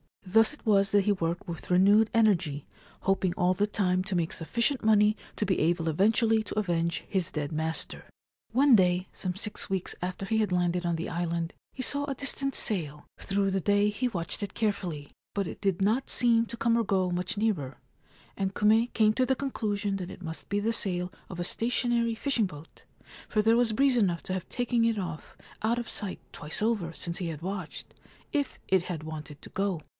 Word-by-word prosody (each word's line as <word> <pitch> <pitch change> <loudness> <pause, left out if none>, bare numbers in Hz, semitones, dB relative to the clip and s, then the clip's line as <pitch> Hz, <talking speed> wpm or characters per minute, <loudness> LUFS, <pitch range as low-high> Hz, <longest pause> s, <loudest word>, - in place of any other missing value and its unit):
Thus 225 +8 +4
it 295 - -16
was 200 -2 +3
that 205 - +5
he 210 - +3
worked 170 -3 -1
with 170 -2 -7
renewed 200 +4 +5
energy, 180 - +2 0.4
hoping 195 -2 +1
all 180 +1 +3
the 205 +3 +1
time 185 -3 +1
to 195 -2 -2
make 170 -2 0
sufficient 235 - 0
money 215 -1 +5 0.2
to 210 - -1
be 190 -1 +1
able 165 0 +1
eventually 220 +6 +3
to 215 - -7
avenge 170 -5 0
his 185 -4 -1
dead 150 -1 -3
master. 160 +1 -2 0.5
One 265 +2 +6
day, 180 -2 +2
some 180 -2 -4
six 210 +1 -4
weeks 190 -2 -2
after 185 +2 -3
he 220 +2 0
had 215 -3 +1
landed 175 0 +1
on 170 -1 +1
the 165 - -4
island, 170 0 -2 0.2
he 260 - -4
saw 285 +3 -1
a 275 -1 -3
distant 275 0 -2
sail. 150 -9 -2
Through 195 0 0
the 190 - +1
day 205 +2 +3
he 210 +5 -1
watched 170 -6 -3
it 205 - -4
carefully; 180 -9 -2 0.2
but 200 -3 0
it - - -7
did 195 -2 0
not 220 +7 +1
seem 230 -1 +3
to 235 - -8
come 230 +1 +2
or 230 - +2
go 190 -3 +1
much 180 +2 -1
nearer, 165 - -1 0.6
and 195 0 -1
Kume 220 +3 +4
came 215 -1 +4
to 255 +3 +2
the 265 - +2
conclusion 205 -7 -2
that 180 -2 -5
it - - -10
must 160 -1 -6
be 205 - +1
the 225 +3 0
sail 180 -4 -1 0.2
of 180 - -7
a - - 0
stationary 235 +2 0
fishing 240 -2 +1
boat, 160 -3 -11 0.4
for 215 - +2
there 225 +2 +4
was 240 -2 +2
breeze 265 +2 +3
enough 180 -7 +1
to 185 - -4
have 185 -2 -4
taken 245 -1 +1
it 230 -1 +1
ofF 170 -5 -5 0.3
out 230 +2 +1
of 240 -1 -4
sight 200 -3 -5
twice 150 +6 -5
over 210 -7 0
since 170 +1 -5
he 180 - -3
had 160 -2 -5
watched, 185 -4 -6 0.4
if 285 -3 -1
it 190 -2 +4
had 170 -4 -5
wanted 155 -2 -7
to - - -11
go. 195 -4 -1
195 Hz, 205 wpm, -28 LUFS, 175-225 Hz, 0.6 s, One